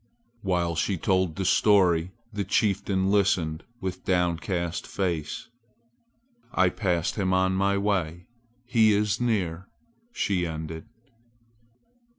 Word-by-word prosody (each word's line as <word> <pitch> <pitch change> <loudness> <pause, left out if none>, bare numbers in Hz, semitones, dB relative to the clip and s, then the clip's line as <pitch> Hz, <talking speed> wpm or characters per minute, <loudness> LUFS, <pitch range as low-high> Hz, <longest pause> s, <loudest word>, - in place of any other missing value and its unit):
While 90 -4 0
she 95 +4 0
told 95 -2 +1
the 95 - -3
story 90 -4 +4 0.2
the 100 -1 -1
chieftain 95 -1 +1
listened 90 -5 +1 0.2
with 95 -1 -4
downcast 85 -1 -1
face. 85 -6 -3 1.0
"I 95 -1 +3
passed 90 -3 -1
him 95 -2 +1
on 95 0 +2
my 100 +1 +1
way. 90 -4 -1 0.4
He 115 -3 +4
is 105 +2 0
near!" 95 -7 -1 0.4
she 95 - 0
ended. 80 +3 -6
95 Hz, 110 wpm, -26 LUFS, 85-100 Hz, 1.0 s, story